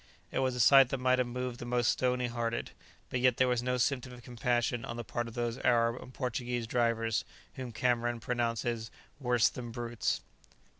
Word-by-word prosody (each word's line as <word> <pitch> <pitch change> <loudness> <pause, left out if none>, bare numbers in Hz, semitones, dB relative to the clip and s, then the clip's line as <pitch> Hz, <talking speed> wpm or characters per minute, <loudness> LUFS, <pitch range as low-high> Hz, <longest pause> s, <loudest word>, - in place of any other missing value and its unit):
It - - -1
was 130 -1 +1
a - - -4
sight 130 +3 +7
that 135 - -1
might 130 0 +2
have 125 - +1
moved 125 0 -4
the - - -6
most 120 -1 +2
stony 125 0 0
hearted, 115 -1 -2 0.4
but 125 - 0
yet 125 -1 +3
there 130 - +4
was 125 -1 +1
no 125 +1 0
symptom 125 0 0
of 120 -1 -12
compassion 120 0 0
on 115 - -5
the 120 - -4
part 120 +1 -3
of 115 - -10
those 120 0 -2
Arab 115 0 +2
and 125 - -11
Portuguese 125 -2 -2
drivers 115 -1 +1 0.3
whom 130 -2 -6
Cameron 120 0 0
pronounces 115 -1 -1 0.3
"worse 125 -3 +3
than 120 -2 -5
brutes." 120 0 -2
120 Hz, 195 wpm, -31 LUFS, 115-125 Hz, 0.4 s, sight